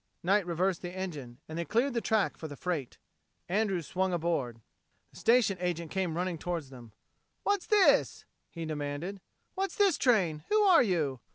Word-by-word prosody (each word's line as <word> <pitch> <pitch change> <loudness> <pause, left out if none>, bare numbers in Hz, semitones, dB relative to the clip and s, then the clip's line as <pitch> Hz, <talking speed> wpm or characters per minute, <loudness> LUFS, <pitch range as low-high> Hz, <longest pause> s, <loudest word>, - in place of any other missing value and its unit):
Knight 195 +1 +2
reversed 180 +1 0
the 175 - -5
engine, 145 -11 -6
and 160 +1 -5
they - - 0
cleared 235 - +1
the 235 - 0
track 220 -3 +1
for 160 - -7
the 145 - -8
freight. 155 -6 -3 0.5
Andrews 190 -3 0
swung 185 +3 -1
aboard. 160 -9 -1 0.5
The - - -16
station 230 -5 +3
agent 170 -3 -2
came 180 -4 -1
running 180 -2 -2
toward 175 -1 -3
them. 120 -4 -12 0.5
"What's 405 -2 0
this?" 415 -2 +3 0.2
he 165 -1 -6
demanded. 155 +5 -4 0.3
"What's 390 0 -2
this 400 -6 +3
train? 180 - +2
Who 430 0 +4
are 370 -4 +7
you?" 160 - 0
180 Hz, 170 wpm, -30 LUFS, 155-210 Hz, 0.5 s, are